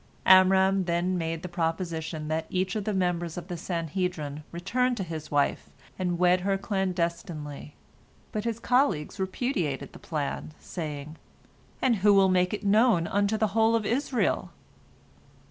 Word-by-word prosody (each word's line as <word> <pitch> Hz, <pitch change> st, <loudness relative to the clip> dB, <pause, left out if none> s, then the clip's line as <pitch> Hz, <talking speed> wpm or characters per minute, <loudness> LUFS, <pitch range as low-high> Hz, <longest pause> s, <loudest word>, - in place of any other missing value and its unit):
Amram 190 Hz, 0 st, +6 dB
then 175 Hz, +2 st, 0 dB
made 165 Hz, -1 st, -3 dB
the -, -, -3 dB
proposition 165 Hz, -2 st, -3 dB
that 160 Hz, +1 st, -2 dB
each 185 Hz, +1 st, -1 dB
of 210 Hz, -2 st, -2 dB
the 215 Hz, -, -1 dB
members 175 Hz, -3 st, -1 dB
of 175 Hz, +1 st, -7 dB
the 175 Hz, -, -3 dB
Sanhedrin 165 Hz, -3 st, -3 dB
return 250 Hz, +9 st, 0 dB
to 200 Hz, -, -3 dB
his 160 Hz, -3 st, -6 dB
wife, 145 Hz, -1 st, 0 dB, 0.3 s
and 180 Hz, -2 st, 0 dB
wed 180 Hz, +1 st, +4 dB
her 195 Hz, +1 st, +1 dB
clandestinely, 170 Hz, -7 st, -3 dB, 0.6 s
but 215 Hz, -3 st, -3 dB
his 230 Hz, -1 st, -2 dB
colleagues 235 Hz, -, +1 dB
repudiated 185 Hz, -, -2 dB
the -, -, -11 dB
plan, 155 Hz, 0 st, -4 dB
saying, 155 Hz, -2 st, -6 dB, 0.7 s
"And 245 Hz, -4 st, +3 dB
who 200 Hz, +1 st, +5 dB
will 195 Hz, -1 st, +5 dB
make 180 Hz, 0 st, +2 dB
it 210 Hz, -, -4 dB
known 210 Hz, -3 st, +4 dB
unto 205 Hz, +4 st, +1 dB
the 215 Hz, -1 st, +1 dB
whole 225 Hz, +1 st, +4 dB
of 225 Hz, -2 st, 0 dB
Israel? 255 Hz, +1 st, 0 dB
180 Hz, 150 wpm, -27 LUFS, 165-200 Hz, 0.7 s, Amram